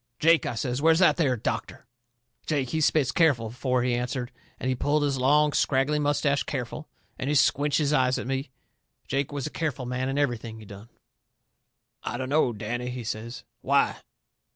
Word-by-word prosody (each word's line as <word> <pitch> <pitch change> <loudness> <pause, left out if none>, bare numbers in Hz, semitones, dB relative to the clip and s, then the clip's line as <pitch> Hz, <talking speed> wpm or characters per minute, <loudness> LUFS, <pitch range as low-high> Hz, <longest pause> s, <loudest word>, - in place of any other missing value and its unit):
"Jake," 165 +1 +4
I - - -3
says, 125 +3 -2
"where's 160 +1 +5
that 180 0 +4
there 135 -7 +2
doctor?" - - -4 0.6
Jake, 140 -5 0
he 160 - 0
spit 145 -3 +2
careful 145 -9 +3
afore 125 +2 -1
he 125 -1 +1
answered, 125 +1 -2 0.3
and - - -3
he 130 - +2
pulled 145 +4 +1
his 140 -2 0
long, 150 +3 +3
scraggly 140 +2 +1
moustache 145 -1 +1
careful, 140 +3 -5 0.3
and 135 - -2
he 150 - +1
squinched 145 +1 +3
his 150 -1 +1
eyes 130 -2 +3
at - - -4
me. 135 +2 -3 0.6
Jake 140 +1 -1
was 145 -2 -4
a 155 - -4
careful 145 -6 -3
man 125 +1 -2
in 135 - -2
everything 120 -5 -1
he 110 - -12
done. 100 +3 -12 1.1
"I 120 - -4
dunno, 130 +1 +1
Danny," 120 +3 -4
he 125 -1 -5
says. 115 +2 -5 0.2
"Why?" - - +2
130 Hz, 180 wpm, -26 LUFS, 125-145 Hz, 1.1 s, where's